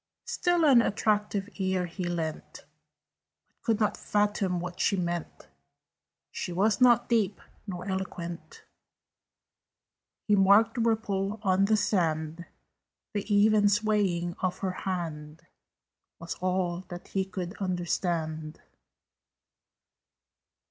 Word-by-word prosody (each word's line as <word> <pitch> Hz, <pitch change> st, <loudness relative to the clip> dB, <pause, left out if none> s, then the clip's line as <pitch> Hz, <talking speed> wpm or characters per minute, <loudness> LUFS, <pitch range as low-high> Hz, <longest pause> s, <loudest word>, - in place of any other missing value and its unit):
Still 350 Hz, -2 st, +1 dB
an 265 Hz, -5 st, +7 dB
attentive 210 Hz, -2 st, 0 dB
ear 190 Hz, -2 st, 0 dB
he 175 Hz, +1 st, -5 dB
lent 165 Hz, -3 st, -4 dB
But -, -, -44 dB
could 225 Hz, -2 st, 0 dB
not 215 Hz, -2 st, +1 dB
fathom 205 Hz, -3 st, 0 dB
what 180 Hz, +1 st, -6 dB
she 200 Hz, -, +2 dB
meant: 175 Hz, -2 st, -4 dB, 0.8 s
She -, -, -4 dB
was 200 Hz, +4 st, +1 dB
not 240 Hz, -1 st, +5 dB
deep, 215 Hz, -4 st, +1 dB, 0.3 s
nor 180 Hz, -1 st, -6 dB
eloquent. 190 Hz, -, -5 dB, 1.6 s
He 210 Hz, -, +5 dB
marked 200 Hz, +3 st, +5 dB
the 240 Hz, -, -2 dB
ripple 215 Hz, -2 st, 0 dB
on 190 Hz, 0 st, +3 dB
the 215 Hz, +1 st, +3 dB
sand: 165 Hz, -4 st, 0 dB, 0.7 s
The 205 Hz, 0 st, -3 dB
even 205 Hz, 0 st, +5 dB
swaying 200 Hz, -5 st, +1 dB
of 185 Hz, -1 st, -1 dB
her 185 Hz, -, 0 dB
hand 165 Hz, -4 st, -5 dB, 0.7 s
Was 170 Hz, 0 st, -5 dB
all 180 Hz, -1 st, -1 dB
that 175 Hz, 0 st, -9 dB
he 195 Hz, -, 0 dB
could 190 Hz, -1 st, -6 dB
understand. 170 Hz, -4 st, -2 dB
190 Hz, 110 wpm, -28 LUFS, 175-210 Hz, 1.6 s, an